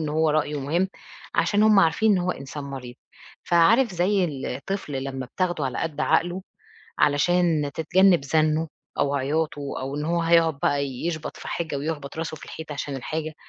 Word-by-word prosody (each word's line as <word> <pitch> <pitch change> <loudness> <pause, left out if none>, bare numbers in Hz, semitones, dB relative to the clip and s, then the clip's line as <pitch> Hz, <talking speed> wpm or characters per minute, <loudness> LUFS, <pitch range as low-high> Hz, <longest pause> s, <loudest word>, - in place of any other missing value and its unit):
إنه 150 -1 -2
هو 160 0 +2
رأيُه 150 -1 0
مُهم، 170 +7 0 0.5
عشان 205 0 +2
هُم 215 -2 +6
عارفين 195 +5 +3
إن 190 - +3
هو 180 0 0
إنسان 140 -1 -6
مريض، 130 -3 -7 0.5
فعارف 205 +8 +4
زي 185 +2 +2
الطفل 145 +4 -4
لمّا 135 -1 -5
بتاخدُه 175 +1 -1
على 130 -2 -3
قد 155 -3 -3
عقلُه، 175 +4 +1 0.6
علشان 155 0 +2
تتجنّب 180 -1 +4
زَنُّه 155 +2 +1 0.3
أو 140 0 +1
عياطُه 145 +2 -1 0.2
أو 135 +2 -4
إن 150 - -2
هو 170 +2 +1
هيقعد 165 -3 +3
بَقى 145 0 +2
يشبط 155 +5 -4
في - - -8
حاجة 160 -4 -3
ويخبط 145 0 -4
راسُه 160 -1 -4
في - - -11
الحيطة 160 -2 -8
عشان 140 -1 -4
الحاجة، 155 +4 -4
155 Hz, 170 wpm, -24 LUFS, 145-175 Hz, 0.6 s, هُم